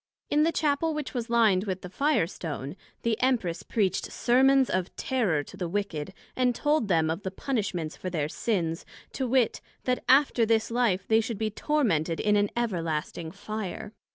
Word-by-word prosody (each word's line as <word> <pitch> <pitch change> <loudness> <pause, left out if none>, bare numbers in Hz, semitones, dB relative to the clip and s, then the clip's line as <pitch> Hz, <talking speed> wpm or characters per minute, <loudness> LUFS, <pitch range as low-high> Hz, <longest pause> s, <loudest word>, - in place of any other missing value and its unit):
In 295 - +4
the 325 +2 +3
Chappel 310 +1 +1
which 300 -2 -4
was 240 -2 -3
lined 220 -5 +3
with 190 -2 -3
the - - -5
Fire 285 - +2
stone, 155 -4 -6 0.3
the 230 -1 0
Empress 225 -10 +1
preached 200 -5 -1
Sermons 265 +2 +4
of 185 -1 -2
Terror 205 - 0
to - - -12
the 175 -2 -4
wicked, 190 -4 -3 0.2
and 250 -1 +2
told 295 -4 +1
them 160 -4 +2
of 165 - -3
the 190 - -3
punishments 190 - -3
for 185 - -4
their 155 -5 -1
sins, 165 -3 -1 0.3
to 265 - -2
wit, 250 -2 +2 0.2
That 250 0 0
after 265 -3 +5
this 225 0 +2
life 225 -6 +1
they 220 0 +4
should 225 -1 -4
be 215 +1 -1
tormented 200 - 0
in 210 0 +2
an 205 0 +2
everlasting 165 -7 -2
Fire. 210 +2 -6
215 Hz, 180 wpm, -27 LUFS, 175-250 Hz, 0.3 s, after